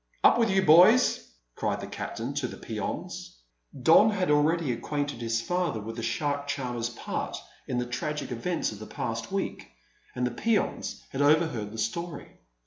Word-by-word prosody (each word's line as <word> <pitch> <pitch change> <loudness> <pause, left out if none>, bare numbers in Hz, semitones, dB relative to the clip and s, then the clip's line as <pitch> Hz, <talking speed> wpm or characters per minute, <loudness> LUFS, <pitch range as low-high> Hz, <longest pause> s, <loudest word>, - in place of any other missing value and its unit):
"Up - - +6
with 230 -2 +3
you, 190 0 +3
boys!" 185 +10 +6 0.3
cried - - -1
the - - -5
captain - - -5
to - - -1
the - - -9
peons. - - -5 0.5
Don 165 - +7
had 190 -6 0
already 150 0 +3
acquainted 145 +1 -3
his 115 0 0
father 175 -6 -1
with 110 +2 -6
the 115 - -4
shark 140 +5 -1
charmer's 120 -4 -2
part 120 - -4 0.3
in 125 - -2
the 125 - 0
tragic 150 +5 -3
events 145 +8 -1
of 105 - -9
the 110 - -8
past 115 +4 -4
week, 195 - -3 0.4
and 125 0 0
the 125 - -1
peons 225 - -1
had 135 - -2
overheard 145 -8 +2
the 110 - -8
story. 150 +8 -4
145 Hz, 170 wpm, -28 LUFS, 115-170 Hz, 0.5 s, Don